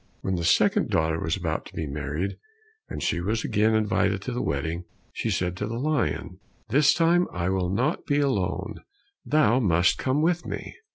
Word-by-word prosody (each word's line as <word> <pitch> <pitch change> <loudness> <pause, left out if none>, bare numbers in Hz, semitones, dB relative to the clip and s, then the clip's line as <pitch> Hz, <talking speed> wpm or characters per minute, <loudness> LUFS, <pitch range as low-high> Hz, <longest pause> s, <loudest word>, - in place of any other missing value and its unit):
When 95 - -2
the 85 -2 -1
second 80 -1 +3
daughter 80 0 +1
was 80 +3 -1
about 80 -4 -3
to - - -15
be 80 - -2
married, 75 +6 -3 0.5
and - - -5
she 85 - 0
was 110 +5 -1
again 110 +2 +2
invited 100 -2 +1
to 125 - -4
the 120 - -2
wedding, 80 +5 -2 0.3
she - - -2
said 90 0 -1
to - - -3
the 115 - -4
lion, 150 +3 -1 0.3
"This 145 +5 +4
time 170 +2 +3
I 90 0 -2
will 95 -2 0
not 125 - -1
be 145 -1 +2
alone, 100 -6 -1 0.4
thou 140 -5 +3
must 90 -5 +3
come 135 +3 +1
with 175 +1 +1
me." - - -6
100 Hz, 185 wpm, -26 LUFS, 85-135 Hz, 0.5 s, This